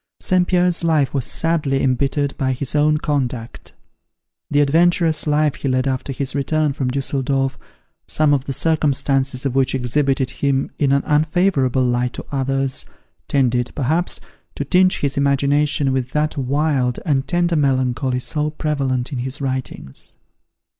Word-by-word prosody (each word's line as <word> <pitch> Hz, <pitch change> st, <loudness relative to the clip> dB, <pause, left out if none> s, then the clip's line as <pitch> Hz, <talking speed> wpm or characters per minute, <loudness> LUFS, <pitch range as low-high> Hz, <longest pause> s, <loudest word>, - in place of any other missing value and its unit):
St. 180 Hz, -1 st, +2 dB
Pierre's 180 Hz, -2 st, +2 dB
life 155 Hz, -5 st, +2 dB
was 135 Hz, -4 st, -1 dB
sadly 155 Hz, -5 st, 0 dB
embittered 140 Hz, +2 st, 0 dB
by 130 Hz, -1 st, 0 dB
his 130 Hz, +1 st, -4 dB
own 150 Hz, +1 st, +3 dB
conduct. 130 Hz, -6 st, -3 dB, 0.8 s
The 145 Hz, -, +2 dB
adventurous 160 Hz, +2 st, +3 dB
life 150 Hz, -1 st, +2 dB
he -, -, -4 dB
led 130 Hz, 0 st, +1 dB
after 130 Hz, +1 st, -2 dB
his 135 Hz, 0 st, -3 dB
return 150 Hz, +1 st, 0 dB
from 135 Hz, -1 st, -2 dB
Dusseldorf, 135 Hz, 0 st, -1 dB, 0.5 s
some 150 Hz, -1 st, +2 dB
of 135 Hz, -1 st, 0 dB
the -, -, -4 dB
circumstances 135 Hz, -3 st, 0 dB
of 135 Hz, -, 0 dB
which 135 Hz, 0 st, +1 dB
exhibited 130 Hz, +1 st, 0 dB
him 135 Hz, -1 st, -1 dB
in 140 Hz, -2 st, +2 dB
an 140 Hz, 0 st, +2 dB
unfavourable 150 Hz, -4 st, +2 dB
light 125 Hz, 0 st, 0 dB
to -, -, -7 dB
others, 135 Hz, -1 st, -1 dB, 0.4 s
tended, 125 Hz, -3 st, +1 dB
perhaps, 160 Hz, +5 st, -1 dB, 0.4 s
to -, -, -3 dB
tinge 185 Hz, 0 st, +3 dB
his 140 Hz, -1 st, -1 dB
imagination 140 Hz, 0 st, +2 dB
with 130 Hz, -1 st, -1 dB
that 150 Hz, 0 st, 0 dB
wild 135 Hz, -2 st, 0 dB
and 135 Hz, -4 st, 0 dB
tender 175 Hz, +1 st, +1 dB
melancholy 130 Hz, -3 st, +1 dB
so 150 Hz, +3 st, -1 dB
prevalent 140 Hz, -4 st, -2 dB
in 130 Hz, -, -3 dB
his 130 Hz, +3 st, -4 dB
writings. 130 Hz, -, -5 dB
140 Hz, 145 wpm, -20 LUFS, 130-150 Hz, 0.8 s, own